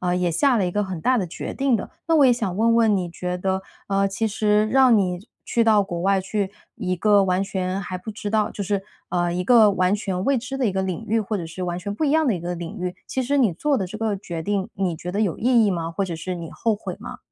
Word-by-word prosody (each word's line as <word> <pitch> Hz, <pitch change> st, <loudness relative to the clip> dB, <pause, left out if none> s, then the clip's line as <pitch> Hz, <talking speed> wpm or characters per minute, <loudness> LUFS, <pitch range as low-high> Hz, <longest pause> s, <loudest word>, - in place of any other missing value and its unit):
呃， 180 Hz, -1 st, 0 dB
也 180 Hz, -1 st, +1 dB
下 255 Hz, -, +3 dB
了 200 Hz, -, +2 dB
一 -, -, -1 dB
个 205 Hz, +3 st, 0 dB
很 185 Hz, -4 st, -5 dB
大 255 Hz, +6 st, +2 dB
的 185 Hz, -, -1 dB
决 165 Hz, -, -6 dB
定 270 Hz, -2 st, +1 dB
的。 210 Hz, -, -2 dB, 0.2 s
那 330 Hz, -, +2 dB
我 295 Hz, -3 st, +6 dB
也 250 Hz, -, +6 dB
想 225 Hz, -7 st, -2 dB
问 230 Hz, +1 st, +3 dB
问， 220 Hz, -3 st, +4 dB
你 180 Hz, -3 st, -2 dB
觉 180 Hz, +1 st, -4 dB
得， 190 Hz, +1 st, -1 dB, 0.3 s
呃， 195 Hz, 0 st, +2 dB
其 210 Hz, +3 st, -1 dB
实 210 Hz, 0 st, +2 dB
让 255 Hz, -1 st, +5 dB
你 180 Hz, -3 st, +1 dB, 0.3 s
去 235 Hz, -, +1 dB
到 215 Hz, -2 st, +5 dB
国 175 Hz, -3 st, -4 dB
外， 195 Hz, +1 st, +3 dB
去 200 Hz, 0 st, -2 dB, 0.2 s
一 185 Hz, -, -1 dB
个 200 Hz, +2 st, +4 dB
完 185 Hz, +1 st, +1 dB
全 190 Hz, 0 st, -2 dB
还 185 Hz, -1 st, -5 dB
不 220 Hz, +4 st, -7 dB
知 205 Hz, 0 st, -5 dB
道 215 Hz, -1 st, +2 dB
就 205 Hz, -, -5 dB
是， 195 Hz, 0 st, -1 dB, 0.2 s
呃， 175 Hz, -1 st, 0 dB
一 180 Hz, -, -1 dB
个 225 Hz, -1 st, +6 dB
完 185 Hz, 0 st, +2 dB
全 195 Hz, -2 st, -2 dB
未 275 Hz, -1 st, +2 dB
知 255 Hz, +3 st, -5 dB
的 260 Hz, -, +1 dB
一 -, -, +2 dB
个 190 Hz, 0 st, 0 dB
领 190 Hz, +4 st, -3 dB
域， 225 Hz, +2 st, +2 dB
或 215 Hz, 0 st, -2 dB
者 175 Hz, -, -4 dB
是 175 Hz, +3 st, -7 dB
完 175 Hz, -1 st, -2 dB
全 200 Hz, +3 st, -4 dB
不 305 Hz, -, -2 dB
一 285 Hz, -, +2 dB
样 315 Hz, 0 st, +3 dB
的 230 Hz, -, +2 dB
一 -, -, -3 dB
个 175 Hz, +1 st, -3 dB
领 170 Hz, -1 st, -7 dB
域， 180 Hz, 0 st, -3 dB
其 260 Hz, -, -1 dB
实 280 Hz, +3 st, 0 dB
你 235 Hz, -9 st, +3 dB
做 285 Hz, -, 0 dB
的 190 Hz, -6 st, -1 dB
这 215 Hz, +4 st, -7 dB
个 220 Hz, -2 st, 0 dB
决 175 Hz, -4 st, -6 dB
定， 200 Hz, +1 st, -1 dB
你 185 Hz, -3 st, -1 dB
觉 175 Hz, +3 st, -6 dB
得 200 Hz, -, -1 dB
有 200 Hz, -6 st, 0 dB
意 240 Hz, -1 st, +4 dB
义 -, -, +2 dB
吗？ 165 Hz, -3 st, -2 dB
或 195 Hz, +4 st, -1 dB
者 175 Hz, -, -4 dB
是 180 Hz, +3 st, -4 dB
你 165 Hz, -1 st, -7 dB
后 225 Hz, -2 st, 0 dB
悔 205 Hz, -, -6 dB
吗？ -, -, -7 dB
195 Hz, 310 characters per minute, -23 LUFS, 180-225 Hz, 0.3 s, 我